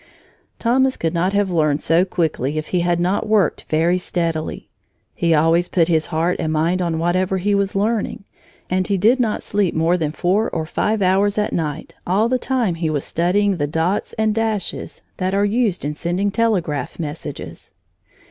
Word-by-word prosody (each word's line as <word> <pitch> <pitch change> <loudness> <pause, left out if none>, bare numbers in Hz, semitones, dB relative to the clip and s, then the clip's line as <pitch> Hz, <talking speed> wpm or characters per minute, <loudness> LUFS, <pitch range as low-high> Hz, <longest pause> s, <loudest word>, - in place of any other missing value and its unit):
Thomas 260 +3 +2
could 165 0 -1
not 180 +3 0
have 200 -2 +1
learned 155 -4 +2
so 170 +3 +2
quickly 155 -6 -1
if 155 - -4
he 180 - +1
had 175 0 +1
not 185 +5 0
worked 210 -6 +2
very 170 +3 +2
steadily. 165 -3 -3 0.5
He 170 - 0
always 165 +3 +3
put 170 -2 +1
his 160 -2 +2
heart 170 +2 0
and 155 - -1
mind 165 +4 +1
on 170 -2 -1
whatever 185 +3 +1
he 205 +3 0
was 200 -1 0
learning, 210 0 -1 0.4
and 185 0 0
he 200 - +1
did 225 +8 +3
not 225 -4 0
sleep 200 -4 0
more 165 +3 +2
than 155 -3 -1
four 190 +7 +1
or 160 - -3
five 210 +5 0
hours 195 +3 +2
at 210 0 0
night 155 -2 -3
all 200 +5 +2
the 255 +1 0
time 245 -8 0
he 165 -1 -2
was 150 -3 -1
studying 190 +3 +1
the 145 -2 -1
dots 165 +6 -1
and 220 -1 +1
dashes 220 -3 -3
that 185 +1 -1
are 200 +1 +3
used 210 - 0
in 150 - -2
sending 175 +6 -1
telegraph 195 -10 -1
messages. 155 -1 -7
180 Hz, 185 wpm, -20 LUFS, 165-205 Hz, 0.5 s, always